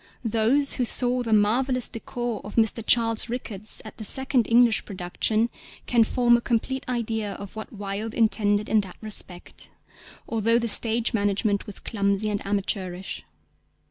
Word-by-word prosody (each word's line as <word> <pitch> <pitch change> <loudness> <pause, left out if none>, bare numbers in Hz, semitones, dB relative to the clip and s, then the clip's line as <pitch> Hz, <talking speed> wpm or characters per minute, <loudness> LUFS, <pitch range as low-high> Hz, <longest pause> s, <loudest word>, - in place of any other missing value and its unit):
Those 230 +6 +2
who 255 - 0
saw 245 +1 +2
the 230 -2 -4
marvellous 240 +4 +3
décor 240 0 -5
of 205 - -9
Mr. 225 0 +2
Charles 230 0 +2
Ricketts 215 -4 -2
at 215 - -10
the 220 - -7
second 260 +2 +1
English 235 -1 +4
production 205 +4 -1 0.3
can 235 -2 +3
form 240 +1 +3
a 235 - 0
complete 245 +3 -1
idea 220 -4 -2
of 200 +1 -10
what 220 - -7
Wilde 205 +1 -5
intended 210 -2 +1
in 215 - +3
that 190 -2 -10
respect; 195 -4 -6 0.6
although 230 +1 +2
the 235 0 -1
stage 230 +2 +3
management 205 0 0
was 205 - -6
clumsy 200 -1 -1
and 205 - -3
amateurish. 190 -2 -3
220 Hz, 150 wpm, -25 LUFS, 205-235 Hz, 0.6 s, English